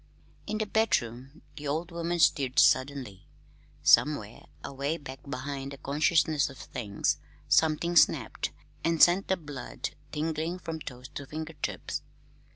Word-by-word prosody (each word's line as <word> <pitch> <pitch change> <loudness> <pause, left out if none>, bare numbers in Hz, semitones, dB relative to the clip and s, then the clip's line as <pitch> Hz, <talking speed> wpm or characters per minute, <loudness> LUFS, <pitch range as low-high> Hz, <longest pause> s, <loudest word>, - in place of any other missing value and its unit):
In 215 - -1
the 215 - 0
bedroom 135 - 0
the 150 -1 -5
old 160 +5 -2
woman 170 +1 -2
stirred 135 -5 +3
suddenly. 130 -7 +2 0.6
Somewhere, 115 -8 +3 0.2
away 140 +4 -2
back 135 -3 -9
behind 135 +1 -4
the - - -9
consciousness 150 +1 +2
of 135 - -12
things, 105 -5 -2 0.3
something 160 +2 +3
snapped, - - +3 0.3
and 165 -1 +1
sent 175 +4 +6
the 190 - +1
blood 145 -5 -6 0.2
tingling 160 +3 -2
from 165 -3 -5
toes 125 -3 -8
to 140 - -7
fingertips. 155 +1 -4
150 Hz, 130 wpm, -29 LUFS, 135-165 Hz, 0.6 s, sent